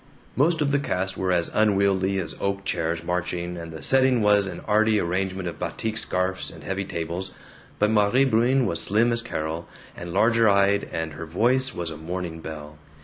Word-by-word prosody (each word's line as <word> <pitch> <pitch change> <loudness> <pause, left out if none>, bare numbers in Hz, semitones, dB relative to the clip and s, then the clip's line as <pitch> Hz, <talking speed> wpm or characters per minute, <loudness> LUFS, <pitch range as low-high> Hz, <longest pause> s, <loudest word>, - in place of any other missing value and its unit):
Most 155 +4 +3
of 145 -1 +1
the 140 - +2
cast 95 -8 -2
were 95 -1 -1
as 85 -2 0
unwieldy 100 -2 +2
as 95 - -2
oak 100 0 -2
chairs 85 -2 -1
marching, 90 0 -2
and 85 -1 -7
the 80 - -8
setting 130 -3 +3
was 105 -1 +4
an - - -7
arty 110 0 +3
arrangement 95 +1 -2
of 80 -3 -6
batik 110 -1 -3
scarfs 95 -3 -1
and - - -12
heavy 95 +1 -3
tables, 85 +2 -5 0.4
but 105 +1 +2
Maire 110 +5 +3
Bruin 125 +2 +3
was 85 - 0
slim 110 +4 +2
as 115 0 0
Carol, 80 -7 -4 0.3
and 85 0 -7
larger 115 +4 +4
eyed, 100 0 +3
and 80 -1 -3
her 80 +2 -7
voice 125 +9 +1
was 85 -2 -3
a 80 - -7
morning 85 +1 -5
bell. 75 -1 -8
95 Hz, 190 wpm, -24 LUFS, 85-110 Hz, 0.4 s, was